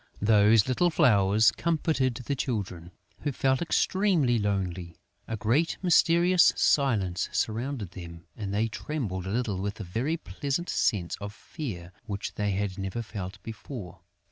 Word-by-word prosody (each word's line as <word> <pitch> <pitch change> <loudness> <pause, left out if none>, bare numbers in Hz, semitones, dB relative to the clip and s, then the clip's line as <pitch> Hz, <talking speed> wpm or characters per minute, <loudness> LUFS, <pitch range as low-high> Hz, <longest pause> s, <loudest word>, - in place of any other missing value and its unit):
Those 105 0 +5
little 150 +8 +2
flowers 110 - +4
comforted 155 -6 0
the 135 +3 -3
Children, 100 -10 -3 0.3
who 145 - -2
felt 130 0 +1
extremely 170 - +2
lonely. 95 -4 -2 0.3
A 110 - -3
great 120 +11 +1
mysterious 175 0 +5
silence 105 -11 +1
surrounded 115 -2 -2
them; 85 -2 -10
and 100 -3 -5
they 105 +3 +1
trembled 105 - -4
a - - -3
little 110 -4 -1
with 100 +2 -4
a - - -4
very 120 - -2
pleasant 150 +2 -3
sense 90 -5 0
of 100 +1 -7
fear 90 - -7 0.2
which 100 -2 -4
they 105 0 -1
had 100 0 -2
never 95 +5 -3
felt 100 -3 -6
before. 110 - -8
110 Hz, 145 wpm, -28 LUFS, 95-140 Hz, 0.3 s, Those